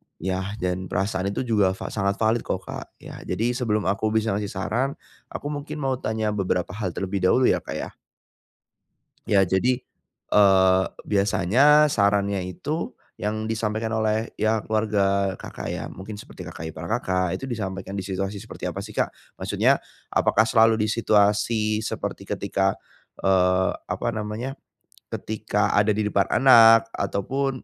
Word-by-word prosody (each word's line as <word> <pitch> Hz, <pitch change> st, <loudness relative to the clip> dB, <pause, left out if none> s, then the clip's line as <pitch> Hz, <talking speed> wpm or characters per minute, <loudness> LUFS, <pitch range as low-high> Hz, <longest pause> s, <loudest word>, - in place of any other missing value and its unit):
Ya 95 Hz, +1 st, -2 dB, 0.2 s
dan 90 Hz, 0 st, -2 dB
perasaan 95 Hz, -1 st, -1 dB
itu 100 Hz, +6 st, -2 dB
juga 105 Hz, -6 st, +2 dB
va -, -, -7 dB
sangat 100 Hz, -2 st, 0 dB
valid 110 Hz, +2 st, +2 dB
kok -, -, -3 dB
Kak. -, -, -7 dB, 0.2 s
Ya -, -, -9 dB
jadi 120 Hz, +3 st, 0 dB
sebelum 115 Hz, -4 st, 0 dB
aku 100 Hz, +3 st, 0 dB
bisa 110 Hz, -1 st, +2 dB
ngasih 105 Hz, +1 st, -1 dB
saran, 110 Hz, +7 st, -2 dB, 0.3 s
aku 145 Hz, -, -5 dB
mungkin 145 Hz, +1 st, -5 dB
mau 130 Hz, -2 st, 0 dB
tanya 110 Hz, -1 st, -1 dB
beberapa 90 Hz, -3 st, -1 dB
hal 95 Hz, -4 st, -4 dB
terlebih 95 Hz, +1 st, -2 dB
dahulu 95 Hz, +8 st, +3 dB
ya -, -, +1 dB
Kak -, -, -7 dB
ya. -, -, -4 dB, 1.4 s
Ya, 100 Hz, -3 st, +4 dB
jadi, 125 Hz, +7 st, +1 dB, 0.5 s
eee, 95 Hz, -2 st, +5 dB, 0.3 s
biasanya 110 Hz, +10 st, +4 dB
sarannya 100 Hz, -4 st, +1 dB
itu 145 Hz, -, -4 dB, 0.2 s
yang 110 Hz, +1 st, -3 dB
disampaikan 110 Hz, 0 st, -2 dB
oleh 110 Hz, +1 st, 0 dB
ya 110 Hz, +1 st, +2 dB
keluarga 100 Hz, -3 st, +1 dB
Kakak -, -, -6 dB
ya -, -, -4 dB
mungkin 100 Hz, +3 st, -8 dB
seperti -, -, -10 dB
kakak 80 Hz, -, -7 dB
ipar 80 Hz, -, -7 dB
Kakak, 90 Hz, -5 st, -1 dB
itu 135 Hz, -, -6 dB
disampaikan 95 Hz, -4 st, -4 dB
di 100 Hz, -, -2 dB
situasi 95 Hz, +1 st, -3 dB
seperti -, -, -6 dB
apa -, -, -5 dB
sih -, -, -9 dB
Kak? -, -, 0 dB, 0.3 s
Maksudnya -, -, +2 dB, 0.3 s
apakah 110 Hz, -, +3 dB
selalu 115 Hz, 0 st, +4 dB
di 110 Hz, -, 0 dB
situasi 105 Hz, 0 st, +2 dB
seperti 110 Hz, -, -5 dB
ketika, 95 Hz, 0 st, 0 dB, 0.5 s
eee, 95 Hz, -1 st, +3 dB, 0.2 s
apa -, -, -3 dB
namanya? 110 Hz, +5 st, -4 dB, 0.6 s
Ketika 105 Hz, -1 st, -1 dB
ada 105 Hz, +1 st, +4 dB
di 105 Hz, 0 st, 0 dB
depan 100 Hz, -1 st, +1 dB
anak 115 Hz, -4 st, +7 dB
ataupun, 130 Hz, +8 st, -1 dB
105 Hz, 150 wpm, -24 LUFS, 95-110 Hz, 1.4 s, anak